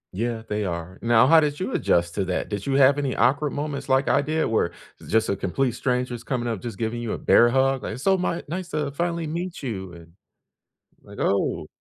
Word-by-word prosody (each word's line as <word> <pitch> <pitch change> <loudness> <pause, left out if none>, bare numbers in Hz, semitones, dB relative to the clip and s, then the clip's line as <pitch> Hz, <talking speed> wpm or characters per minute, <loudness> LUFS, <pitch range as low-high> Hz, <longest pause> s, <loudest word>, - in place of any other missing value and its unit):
Yeah, 115 +2 -2
they 105 0 -2
are. 90 0 -5
Now, 115 0 +5
how 160 +4 +7
did 150 0 -1
you 190 - -3
adjust 85 - +1
to 100 - 0
that? 90 0 -2
Did 100 +2 -4
you 135 - 0
have 140 +1 +5
any 135 -3 -1
awkward 140 +5 +2
moments 140 -2 -4
like 135 +1 +3
I - - +3
did 155 +2 0
where 110 -6 +1 0.3
it's - - -13
just 110 0 +3
a 100 - 0
complete 120 +7 -1
stranger's 125 -1 -2
coming 120 -3 -2
up 110 -5 -3
just 115 -5 -6
giving 115 +1 -2
you 115 -2 -3
a - - -3
bear 120 - +5
hug? 135 +1 +2
Like, - - -4
"It's 130 - -9
so 195 +3 +4
my 180 -2 -2
nice 175 +2 -5
to 150 -2 -2
finally 170 +2 -2
meet 170 +2 -5
you," 95 -8 -4
and, 85 -1 -14 0.9
like, - - -12
"Oh!" 100 - 0
125 Hz, 230 wpm, -24 LUFS, 110-145 Hz, 0.9 s, how